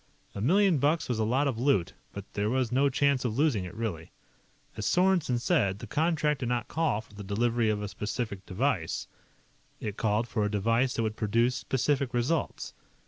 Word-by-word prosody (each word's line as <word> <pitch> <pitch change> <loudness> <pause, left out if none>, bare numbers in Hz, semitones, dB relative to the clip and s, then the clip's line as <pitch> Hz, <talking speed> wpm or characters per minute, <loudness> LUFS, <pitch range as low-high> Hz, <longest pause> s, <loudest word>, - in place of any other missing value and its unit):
A 100 - -5
million 180 - +4
bucks 150 +4 +1
was 120 -3 -1
a - - +2
lot 130 +6 +1
of 125 -5 -2
loot, 125 -9 +2 0.2
but 100 -1 -7
there 105 +1 0
was 125 -1 0
no 135 +3 +3
chance 140 -1 +2
of 120 -2 -2
losing 135 -11 +2
it, 90 - -9
really. 100 -8 -4 0.7
As 105 - -3
Sorensen 180 -8 +2
said, 120 - +1
the - - -8
contract 150 -2 +1
did 120 - -2
not 120 -2 -1
call 160 -10 0
for 110 - -21
the 105 0 -8
delivery 115 +3 +1
of 105 -1 -1
a - - -3
specific 105 -1 -4
device, 95 - -1 0.7
it 105 -2 -5
called 110 +2 +1
for 110 -3 -1
a 105 - +1
device 115 +5 +1
that 115 - 0
would 110 -1 -2
produce 115 +3 +2
specific 135 0 -1
results. 135 +7 -1
120 Hz, 195 wpm, -29 LUFS, 105-140 Hz, 0.7 s, million